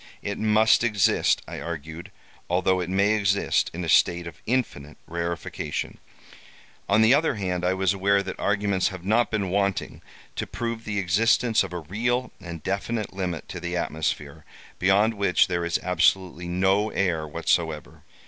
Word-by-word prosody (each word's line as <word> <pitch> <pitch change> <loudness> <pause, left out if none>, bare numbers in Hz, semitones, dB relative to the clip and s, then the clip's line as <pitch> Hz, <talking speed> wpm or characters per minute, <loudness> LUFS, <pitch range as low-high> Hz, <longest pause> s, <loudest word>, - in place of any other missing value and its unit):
It 100 - -4
must 110 +1 +4
exist, 105 -5 +2
I - - -6
argued; 80 0 -7 0.4
although 95 +1 +2
it 90 -1 -3
may 100 +2 +2
exist 100 -2 +1
in 90 +2 -5
a - - -5
state 85 +2 +3
of 85 -3 -10
infinite 105 - -2
rarefaction. 85 0 -4 0.9
"On 105 +2 +5
the 115 +3 +6
other 145 -1 +2
hand, 90 -3 -2
I 90 +1 +1
was 95 0 +1
aware 100 +1 +2
that 95 - -7
arguments 100 -2 +1
have 95 -2 -7
not 115 +4 +2
been 100 -4 -2
wanting 100 -1 -1 0.4
to - - -3
prove 115 -1 -4
the 105 -1 -3
existence 110 +5 +2
of 95 - -7
a 90 -1 -5
real 120 +9 -1
and 85 -3 -8
definite 105 +3 -3
limit 90 -5 -4
to - - -6
the 85 0 -3
atmosphere, 80 -3 -3 0.4
beyond 100 +4 +3
which 100 -5 +3
there 85 -1 -2
is 85 -1 0
absolutely 90 0 +1
no 95 +4 +2
air 85 -7 -1
whatsoever. 80 -1 -2
95 Hz, 160 wpm, -25 LUFS, 85-105 Hz, 0.9 s, the